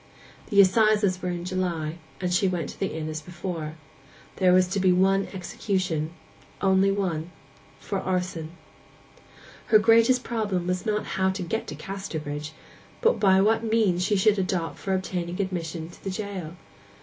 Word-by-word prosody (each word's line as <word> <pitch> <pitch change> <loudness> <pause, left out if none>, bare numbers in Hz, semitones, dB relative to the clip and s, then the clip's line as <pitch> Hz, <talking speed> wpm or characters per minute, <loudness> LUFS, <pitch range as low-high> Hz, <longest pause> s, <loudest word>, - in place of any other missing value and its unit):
The 200 - +3
assizes 200 -1 +4
were 180 - -2
in 175 -1 -4
July, 175 -3 -2 0.2
and 180 -1 -1
she 190 +2 +3
went 175 -5 -2
to - - -10
the 195 - 0
inn 155 -1 -3
as 155 0 -4
before. 170 -3 -5 0.6
There 185 -2 +4
was 185 0 +5
to 195 - -1
be 185 -1 +4
one 195 +2 +3
execution—only 190 +1 -1
one—for 185 +1 -5
arson. 180 -4 -2 1.2
Her 215 - +7
greatest 230 +3 +4
problem 210 -7 -1
was 180 +4 -2
not 210 0 0 0.2
how 190 - +4
to 190 0 -3
get 220 +6 -3
to - - -6
Casterbridge, 155 -6 -5 0.5
but 475 +1 +3
what 200 +3 +4
means 215 -6 +2
she 205 +3 +2
should 205 +1 +3
adopt 180 -3 -2
for 190 -1 -1
obtaining 180 -1 -3
admission 170 -4 -3
to 175 - -16
the 195 - -3
jail. 190 -4 -5
185 Hz, 150 wpm, -26 LUFS, 175-200 Hz, 1.2 s, Her